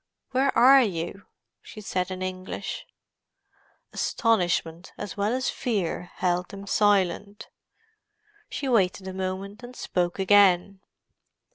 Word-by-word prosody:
"Where 265 +1 +2
are 265 +3 +8
you?" 185 -3 -3 0.3
she 215 - -11
said 185 -3 -2
in 185 0 -5
English. 185 0 -5 1.1
Astonishment 180 -7 0
as 205 -2 -6
well 205 +1 0
as 255 +1 0
fear 185 -7 -2
held 180 0 0
them 200 0 -9
silent. 200 0 +1 1.0
She 280 - -4
waited 195 -5 +1
a 190 - -5
moment, 190 +3 -4
and 245 +1 -10
spoke 175 -6 -2
again. 195 -1 +4
195 Hz, 115 wpm, -26 LUFS, 185-215 Hz, 1.1 s, are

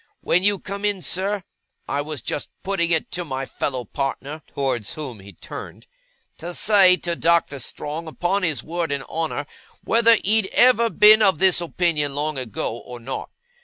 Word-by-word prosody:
When 180 - +2
you 205 +1 +3
come 200 +2 -7
in, 205 -3 0
sir, 195 +1 -1 0.4
I 145 - -1
was 145 -4 -6
just - - -3
putting 190 -3 0
it 165 -2 0
to 180 - -3
my 135 -4 -4
fellow 130 -2 -4
partner,' 140 +5 -4
towards 130 -6 -2
whom 135 -8 -7
he 100 +1 -12
turned, 85 - -10 0.5
'to 175 +2 -6
say 195 -4 +6
to 170 -1 -3
Doctor 165 -4 +1
Strong 150 +5 -5
upon 175 +5 -1
his 155 -9 0
word 170 -1 -3
and 140 -1 -2
honour, 160 -2 -3 0.4
whether 230 0 +5
he'd 215 0 +3
ever 240 -2 +5
been 215 0 +7
of 195 -6 +4
this 185 0 +3
opinion 165 -4 0
long 150 -1 -1
ago, 115 -2 -4
or 125 -1 -10
not. 130 +3 -6
165 Hz, 170 wpm, -22 LUFS, 140-190 Hz, 0.5 s, been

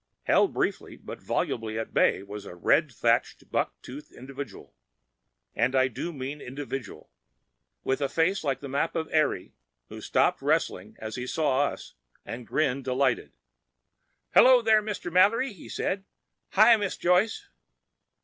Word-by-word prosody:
Held - - +3
briefly - - -2
but - - -9
volubly 110 -1 -2
at 115 - -5
bay 95 - +3
was 100 0 -8
a - - -9
red 90 - +2
thatched, - - 0
buck - - -1
toothed 140 +4 -10
individual—and 130 -1 -7
I 130 0 +4
do 170 +8 -5
mean 140 0 -6
individual!—with 135 0 -7
a 140 - 0
face 165 +6 +1
like 140 -3 -1
the 140 - -6
map 140 +5 -1
of 160 -1 -1
Eire, 155 - +1 0.4
who - - -9
stopped - - +1
wrestling - - -1
as 110 +2 -6
he 125 0 -4
saw 145 -1 +1
us, - - -8 0.3
and 120 0 -7
grinned 135 -3 0
delightedly. 130 -1 0 1.0
"Hello, 255 -2 +7
Mr. 215 -5 +1
Mallory," 215 +7 +4
he 185 - -13
said. 195 0 -2 0.5
"Hi, 235 - +7
Miss 205 -3 -3
Joyce." 210 - +1
140 Hz, 140 wpm, -27 LUFS, 125-180 Hz, 1.0 s, Hello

